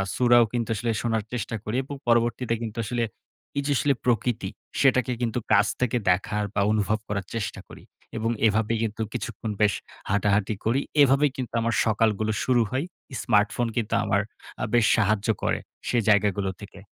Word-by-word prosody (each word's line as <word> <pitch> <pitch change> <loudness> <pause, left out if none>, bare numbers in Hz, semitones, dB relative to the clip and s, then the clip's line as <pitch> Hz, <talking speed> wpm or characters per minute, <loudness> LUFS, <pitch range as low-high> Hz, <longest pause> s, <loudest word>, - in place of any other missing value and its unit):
সুরাও 120 -1 +5
কিন্তু 115 -2 -1
আসলে 115 +3 -1
শোনার 115 -3 0
চেষ্টা 115 -1 -3
করি 105 +2 -3
এবং 140 +2 -7
পরবর্তীতে 120 0 +2
কিন্তু 115 0 -6
আসলে 120 +2 -1 0.6
এইযে 145 +1 -1
আসলে 140 +4 +2
প্রকৃতি, 115 -4 0 0.3
সেটাকে 130 -2 +3
কিন্তু 120 0 0
কাছ 100 0 +5
থেকে 125 -1 +1
দেখার 100 +3 +1
বা 100 - +1
অনুভব 110 0 +1
করার 100 -2 -3
চেষ্টা 110 -4 -3
করি - - -13 0.3
এবং 115 +1 0 0.2
এভাবে 110 +2 +1
কিন্তু 110 0 -3
কিছুক্ষণ 110 0 -4
বেশ 105 -2 +4 0.4
হাঁটাহাঁটি 100 +1 +1
করি। 125 +5 +2 0.2
এভাবেই 140 +1 +4
কিন্তু 125 -3 -5
আমার 115 0 0
সকালগুলো 110 -1 +1
শুরু 125 -2 +3
হয়। 135 +5 -1 0.4
স্মার্টফোন 110 +2 +2
কিন্তু 115 -1 -1
আমার 100 0 +2 0.4
আ - - 0
বেশ 120 -2 +5
সাহায্য 105 -1 +1 0.2
করে, - - +1 0.3
সে 120 - +1
জায়গাগুলো 100 -1 +3
থেকে। 100 -1 -11
115 Hz, 165 wpm, -25 LUFS, 105-120 Hz, 0.6 s, সুরাও